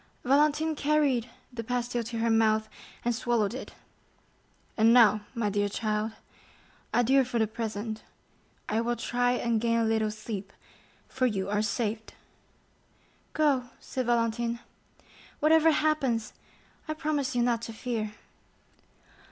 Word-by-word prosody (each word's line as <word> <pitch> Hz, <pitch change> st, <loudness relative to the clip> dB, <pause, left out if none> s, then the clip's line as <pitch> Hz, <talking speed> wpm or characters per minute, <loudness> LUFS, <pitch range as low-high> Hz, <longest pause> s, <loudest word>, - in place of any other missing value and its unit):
Valentine 300 Hz, +4 st, +3 dB
carried 285 Hz, -5 st, +1 dB, 0.2 s
the 230 Hz, -1 st, -4 dB
pastille 245 Hz, 0 st, -1 dB
to 230 Hz, +1 st, -5 dB
her 230 Hz, +1 st, +1 dB
mouth, 220 Hz, -1 st, +3 dB, 0.4 s
and 240 Hz, -, +2 dB
swallowed 230 Hz, -2 st, 0 dB
it. 260 Hz, -, -7 dB, 1.0 s
"And 225 Hz, +1 st, +5 dB
now, 215 Hz, -3 st, +6 dB
my 215 Hz, -3 st, 0 dB
dear 205 Hz, 0 st, +1 dB
child, 215 Hz, +1 st, -2 dB, 0.8 s
adieu 265 Hz, +3 st, +4 dB
for 245 Hz, -1 st, -3 dB
the 220 Hz, -, +3 dB
present. 220 Hz, 0 st, -4 dB, 0.7 s
I 220 Hz, +2 st, +1 dB
will 240 Hz, +1 st, 0 dB
try 245 Hz, +1 st, 0 dB
and 235 Hz, -2 st, 0 dB
gain 230 Hz, 0 st, +2 dB
a 230 Hz, -, +2 dB
little 220 Hz, -1 st, +1 dB
sleep, 210 Hz, -2 st, -6 dB, 0.5 s
for 255 Hz, -1 st, 0 dB
you 200 Hz, -3 st, -2 dB
are 210 Hz, 0 st, +2 dB
saved." 220 Hz, +1 st, -2 dB, 1.2 s
"Go," 285 Hz, -5 st, +2 dB
said 255 Hz, -2 st, -4 dB
Valentine, 235 Hz, 0 st, 0 dB, 0.8 s
"whatever 320 Hz, +1 st, +5 dB
happens, 280 Hz, -8 st, +1 dB, 0.5 s
I 310 Hz, -, -2 dB
promise 300 Hz, -4 st, -1 dB
you 240 Hz, -, +3 dB
not 235 Hz, -2 st, +1 dB
to 235 Hz, -, -6 dB
fear." 220 Hz, -2 st, -3 dB
235 Hz, 130 wpm, -28 LUFS, 220-255 Hz, 1.2 s, now